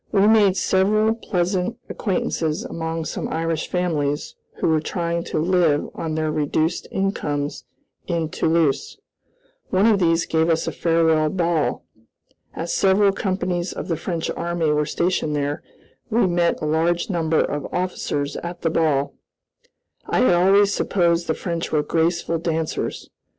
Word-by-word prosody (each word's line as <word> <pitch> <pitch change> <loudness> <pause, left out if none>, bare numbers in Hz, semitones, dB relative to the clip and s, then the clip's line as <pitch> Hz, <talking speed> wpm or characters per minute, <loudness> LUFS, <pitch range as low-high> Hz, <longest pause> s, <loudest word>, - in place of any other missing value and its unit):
We 200 -2 +4
made 210 -3 +5
several 215 +5 +2
pleasant 185 0 -1
acquaintances 180 -1 -2
among 165 -5 -4
some - - -4
Irish 165 0 -2
families 150 -5 -1 0.2
who - - -1
were 160 -1 +2
trying 170 0 -2
to - - -3
live 165 -2 +2
on 160 -1 -4
their 155 -1 0
reduced 155 +2 -1
incomes 150 -7 -2 0.4
in 165 -3 -1
Toulouse. 160 -3 0 0.7
One 190 +2 +3
of 220 -3 +4
these 165 -1 +2
gave 160 +1 +1
us 165 -1 +1
a - - -2
farewell 160 -2 +2
ball. 165 -7 0 0.7
As 170 +1 -3
several 195 +1 +4
companies 185 -2 -2
of - - -6
the 165 - +1
French 165 0 -3
army 170 -2 -1
were 150 0 +1
stationed 170 -4 0
there, 145 0 -2 0.5
we 230 -1 +3
met 175 -1 +1
a - - 0
large 170 +4 +1
number 165 -3 +1
of 145 0 -2
officers 160 -5 -2
at 175 +1 -7
the 165 - +1
ball. 150 -4 +1 0.9
I - - +1
had 255 - +5
always 195 +3 +4
supposed 170 -2 +1
the 160 - 0
French 170 -2 -4
were 150 -1 +2
graceful 165 +1 0
dancers. 165 -1 -2
170 Hz, 145 wpm, -22 LUFS, 160-185 Hz, 0.9 s, made